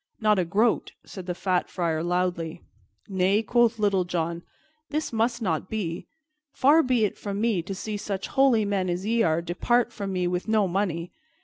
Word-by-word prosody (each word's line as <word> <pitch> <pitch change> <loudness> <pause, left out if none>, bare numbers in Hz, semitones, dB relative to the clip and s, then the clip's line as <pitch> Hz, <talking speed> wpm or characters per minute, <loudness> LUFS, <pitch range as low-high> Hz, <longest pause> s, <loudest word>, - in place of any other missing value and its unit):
"Not 215 -2 +3
a 180 - +1
groat," 210 +7 +1
said 190 -2 -9
the 180 - -2
fat 185 -1 0
Friar 165 -3 -1
loudly. 175 -1 -1 0.4
"Nay," 195 +2 +2
quoth 235 +1 +3
Little 200 -3 +2
John, 170 -1 -2 0.5
"this 305 -4 -2
must 235 +1 0
not 170 -1 -1
be. 180 -6 -4 0.4
Far 290 +5 +5
be 250 -6 +2
it 205 - -4
from 200 -1 -4
me 220 -5 +1
to 190 +4 -6
see 210 +2 -4
such 195 -2 -4
holy 260 -6 +3
men 195 -2 0
as 175 +2 -2
ye 230 +2 +2
are 165 -3 +2
depart 235 +8 +1
from 200 -2 -4
me 180 -1 -1
with 180 +2 -2
no 215 -2 +3
money. 175 -2 -2
195 Hz, 185 wpm, -26 LUFS, 175-220 Hz, 0.5 s, Far